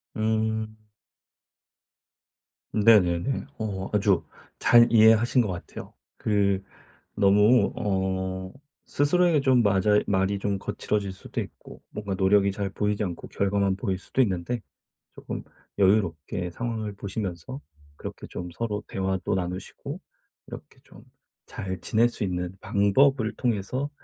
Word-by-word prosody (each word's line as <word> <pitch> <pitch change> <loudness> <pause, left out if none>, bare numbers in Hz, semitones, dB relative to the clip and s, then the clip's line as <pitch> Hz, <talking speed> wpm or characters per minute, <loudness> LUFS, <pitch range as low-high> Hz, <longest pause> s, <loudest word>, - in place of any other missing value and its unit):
음. 110 0 -1 2.0
네네네. 105 +2 +3
어 95 -3 -3
아주 100 -4 +2 0.4
잘 120 -1 +6
이해하신 115 +2 +5
것 105 - -1
같아요. 90 - -8 0.2
그 100 -2 +1 0.5
너무 105 +4 +4
어 95 -1 -2 0.3
스스로에게 165 +1 +3
좀 130 -3 +4
마자이 105 0 +3
말이 95 0 +1
좀 100 0 -1
거칠어질 100 0 -2
수도 95 - -5
있고 - - -11
뭔가 105 -2 -5
노력이 100 +1 +3
잘 100 0 -3
보이지 105 +2 -1
않고 90 -4 -5
결과만 100 -1 0
보일 95 -2 -2
수도 130 - -1
있는데 105 +1 -1 0.5
쪼끔 - - -6 0.4
여유롭게 90 -3 +1
상황을 110 +1 -4
보시면서 100 - -5 0.4
그렇게 - - -8
좀 90 0 -6
서로 105 0 -3
대화도 95 -1 -1
나누시고 90 0 -5 0.5
이렇게 - - -11
좀 - - -16 0.4
잘 95 -2 -6
지낼 115 +5 +3
수 115 - -5
있는 90 -1 -2
방법을 110 +4 +2
통해서 125 +4 -1
100 Hz, 255 characters per minute, -26 LUFS, 95-110 Hz, 2.0 s, 잘